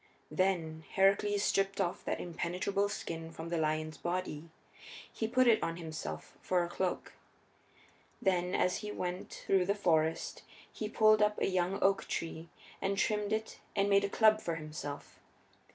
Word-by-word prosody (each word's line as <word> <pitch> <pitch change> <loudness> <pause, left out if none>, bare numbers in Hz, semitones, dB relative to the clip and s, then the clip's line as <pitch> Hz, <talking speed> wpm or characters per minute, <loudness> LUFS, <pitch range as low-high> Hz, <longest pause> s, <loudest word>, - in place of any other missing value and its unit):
Then 165 -4 0
Heracles 200 +1 +3
stripped 195 -1 +1
off 180 -2 -1
that - - -1
impenetrable 180 +4 -1
skin 165 -5 -5
from 165 +1 -7
the 170 -1 0
lion's 155 0 -1
body; 175 -3 -3 0.6
he 220 - -1
put 255 +3 +3
it 230 -2 +6
upon 165 0 -2
himself 150 - -6
for 180 -1 +1
a - - -2
cloak. 180 +1 -2 1.1
Then, 180 -1 +1
as 180 - +2
he 210 -1 -5
went 180 -2 -4
through 190 -2 +3
the 200 - +2
forest, 160 -5 +1 0.3
he 215 - -4
pulled 215 -1 +5
up 210 0 +2
a - - +2
young 185 0 +1
oak 195 0 +3
tree 165 0 -4 0.3
and 195 +1 0
trimmed 210 0 +1
it 220 0 -2 0.2
and 200 0 +2
made 200 0 +5
a 200 - 0
club 215 0 +4
for 170 - -2
himself. 155 -2 -7
185 Hz, 160 wpm, -33 LUFS, 165-200 Hz, 1.1 s, it